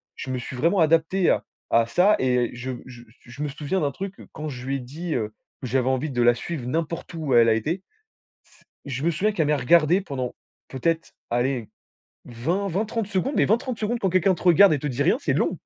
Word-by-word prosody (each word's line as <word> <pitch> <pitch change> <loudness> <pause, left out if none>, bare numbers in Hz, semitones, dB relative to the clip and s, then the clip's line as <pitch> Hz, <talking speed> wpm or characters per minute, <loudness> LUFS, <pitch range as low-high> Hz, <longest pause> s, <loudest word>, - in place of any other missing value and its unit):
Je 130 - -6
me 130 - -2
suis 130 - -7
vraiment 170 +9 +2
adapté 165 +3 +3
à - - +1 0.3
à 115 0 +4
ça 190 - +4
et 125 -2 +1
je 125 +2 -5
je 120 -2 -12 0.2
je 130 +4 -11
me - - -1
souviens 150 +6 -2
d'un 145 -1 0
truc 195 +6 -6
que - - -12
quand 155 0 -5
je 125 -2 -7
lui 135 - 0
ai - - -6
dit, 155 +7 -5
heu, 110 -2 -2 0.3
que 130 - -4
j'avais 130 +1 +1
envie 135 +3 -1
de 120 -1 0
la 120 0 +5
suivre 135 -2 -5
n'importe 165 +4 -3
où 150 -5 -2
elle 115 -1 +6
a - - +5
été 165 - -2 1.0
je 135 0 -4
me 170 - +2
souviens 205 +7 +1
qu'elle 160 -7 0
m'ait 150 - +3
regardé 170 +6 +4
pendant, 130 -8 -4 0.3
peut-être, 165 +5 -2 0.2
allez, 120 -1 -1 0.6
20-20-30 195 - -2
secondes 210 +8 -1
mais - - +4
20-30 235 +2 0
secondes 230 +2 -1
quand 190 - +1
quelqu'un 185 +1 +3
te - - -11
regarde 180 0 +7
et 145 - 0
te 150 - -3
dit 135 +1 -1
rien - - +3
c'est 135 - 0
long, 170 +4 0
150 Hz, 220 wpm, -24 LUFS, 125-180 Hz, 1.0 s, regarde